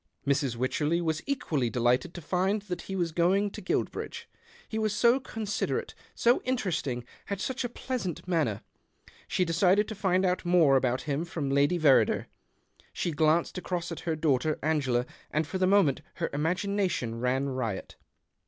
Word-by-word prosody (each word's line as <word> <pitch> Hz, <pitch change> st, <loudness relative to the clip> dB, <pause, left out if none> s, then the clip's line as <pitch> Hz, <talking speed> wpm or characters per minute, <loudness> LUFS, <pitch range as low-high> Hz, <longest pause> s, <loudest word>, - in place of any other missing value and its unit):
Mrs. 140 Hz, -3 st, +1 dB
Wycherley 150 Hz, +7 st, 0 dB
was 160 Hz, -2 st, -1 dB
equally 155 Hz, -, 0 dB
delighted 125 Hz, +6 st, +1 dB
to 175 Hz, -, -7 dB
find 190 Hz, +5 st, 0 dB
that 180 Hz, -4 st, -5 dB
he 195 Hz, -, -6 dB
was 175 Hz, -3 st, 0 dB
going 190 Hz, +5 st, +2 dB
to 210 Hz, -, -8 dB
Guilbridge. 185 Hz, -, -3 dB, 0.4 s
He 220 Hz, -, -3 dB
was 215 Hz, -1 st, 0 dB
so 235 Hz, +4 st, +4 dB
considerate, 220 Hz, -5 st, -3 dB, 0.2 s
so 240 Hz, +1 st, +3 dB
interesting, 175 Hz, -, -2 dB, 0.2 s
had 200 Hz, -1 st, -3 dB
such 255 Hz, +5 st, -2 dB
a 245 Hz, -, -2 dB
pleasant 230 Hz, -, -4 dB
manner. 155 Hz, -, 0 dB, 0.6 s
She 185 Hz, -, +1 dB
decided 185 Hz, +5 st, +3 dB
to -, -, -4 dB
find 190 Hz, -2 st, +1 dB
out 180 Hz, 0 st, 0 dB
more 175 Hz, -6 st, +5 dB
about 130 Hz, -1 st, +1 dB
him 145 Hz, +1 st, -2 dB
from 155 Hz, -5 st, -3 dB
Lady 145 Hz, +5 st, +3 dB
Verrider. 150 Hz, -5 st, +4 dB, 0.7 s
She 175 Hz, -, -2 dB
glanced 160 Hz, +4 st, +2 dB
across 175 Hz, -2 st, -3 dB
at 165 Hz, -, -5 dB
her 165 Hz, -2 st, -2 dB
daughter 155 Hz, -1 st, +1 dB
Angela, 135 Hz, -6 st, +1 dB, 0.2 s
and 155 Hz, +1 st, 0 dB
for 175 Hz, +5 st, -4 dB
the 185 Hz, -, +3 dB
moment 190 Hz, -8 st, +4 dB
her -, -, -2 dB
imagination 175 Hz, -, -1 dB
ran 130 Hz, +3 st, 0 dB
riot. 115 Hz, -7 st, -3 dB
170 Hz, 160 wpm, -29 LUFS, 140-195 Hz, 0.7 s, more